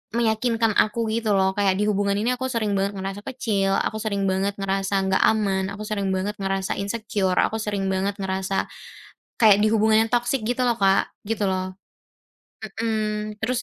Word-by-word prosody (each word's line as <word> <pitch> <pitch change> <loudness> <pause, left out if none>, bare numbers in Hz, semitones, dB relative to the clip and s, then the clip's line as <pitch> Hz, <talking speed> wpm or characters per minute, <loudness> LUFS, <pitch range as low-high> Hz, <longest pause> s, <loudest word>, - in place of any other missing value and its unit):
meyakinkan 225 0 +1
aku 220 +1 +1
gitu 220 -3 +1
loh. 190 0 +3
Kayak 195 -1 +1
di - - +2
hubungan 200 -1 +1
ini 225 +5 0
aku 260 - -1
sering 230 -5 -1
banget 200 +1 -1
ngerasa 195 +1 -5
kecil, 200 -7 0
aku 220 - -1
sering 200 -2 -2
banget 195 +1 0
ngerasa 195 0 -2
nggak 190 0 +1
aman, 195 -3 +1
aku 215 - -7
sering 205 -2 -2
banget 200 +3 -2
ngerasa 195 0 -2
insecure, 200 -2 -1
aku 220 0 -1
sering 200 -3 -2
banget 195 +1 -1
ngerasa 190 0 -2 0.6
kayak 210 -4 +6
di 215 - +3
hubungan 220 +1 +3
yang - - -20
toksik 240 -1 0
gitu 250 +1 0
loh, 235 -2 +1
Kak. 195 0 +3 0.2
Gitu 220 -2 -1
loh. 185 -1 -1 0.9
Mhm. 215 -1 -3
Terus 245 +3 -1
210 Hz, 175 wpm, -23 LUFS, 195-220 Hz, 0.9 s, kayak